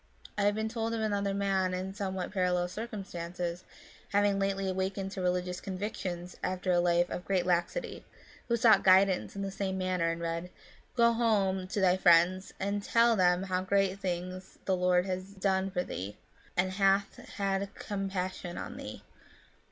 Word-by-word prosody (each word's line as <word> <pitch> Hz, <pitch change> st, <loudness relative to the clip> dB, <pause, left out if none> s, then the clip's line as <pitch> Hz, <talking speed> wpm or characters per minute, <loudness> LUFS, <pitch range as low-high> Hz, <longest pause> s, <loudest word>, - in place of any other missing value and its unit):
I 205 Hz, -, +1 dB
have 205 Hz, 0 st, +3 dB
been 220 Hz, 0 st, -1 dB
told 225 Hz, 0 st, -2 dB
of -, -, -2 dB
another 200 Hz, -2 st, 0 dB
man 190 Hz, -2 st, +1 dB
in 190 Hz, +1 st, -4 dB
somewhat 190 Hz, -2 st, -3 dB
parallel 180 Hz, -2 st, +1 dB
circumstances, 180 Hz, -4 st, -5 dB, 0.5 s
having 205 Hz, -1 st, +2 dB
lately 195 Hz, 0 st, 0 dB
awakened 190 Hz, +1 st, -2 dB
to 190 Hz, -, -5 dB
religious 180 Hz, 0 st, -1 dB
convictions 185 Hz, -2 st, -4 dB
after 185 Hz, 0 st, -1 dB
a 175 Hz, -, +4 dB
life 175 Hz, 0 st, +3 dB
of 180 Hz, -, -4 dB
great 185 Hz, -2 st, 0 dB
laxity, 180 Hz, -, -1 dB, 0.4 s
who 235 Hz, -, +2 dB
sought 225 Hz, -2 st, +5 dB
guidance 190 Hz, 0 st, +4 dB
in 200 Hz, -, -3 dB
the 195 Hz, -, -3 dB
same 190 Hz, -1 st, -2 dB
manner, 185 Hz, -2 st, 0 dB
and 165 Hz, -, -4 dB
read, 170 Hz, +1 st, -3 dB, 0.2 s
" -, -, -29 dB
Go 235 Hz, 0 st, +5 dB
home 200 Hz, -5 st, +1 dB
to 205 Hz, -, -2 dB
thy 185 Hz, -1 st, +4 dB
friends, 180 Hz, +1 st, +4 dB
and 200 Hz, +1 st, -1 dB
tell 230 Hz, +2 st, +4 dB
them 180 Hz, -1 st, +3 dB
how 185 Hz, -1 st, -1 dB
great 195 Hz, 0 st, +1 dB
things 185 Hz, 0 st, -4 dB
the 190 Hz, -, +2 dB
Lord 180 Hz, 0 st, +3 dB
hath 190 Hz, +1 st, -5 dB
done 190 Hz, 0 st, +1 dB
for 180 Hz, -2 st, -1 dB
thee, 100 Hz, -, -6 dB, 0.4 s
and 185 Hz, +1 st, +2 dB
hath 195 Hz, +1 st, +2 dB, 0.2 s
had 195 Hz, 0 st, -1 dB
compassion 190 Hz, -3 st, -4 dB
on -, -, -6 dB
thee." -, -, -8 dB
190 Hz, 170 wpm, -30 LUFS, 180-200 Hz, 0.5 s, sought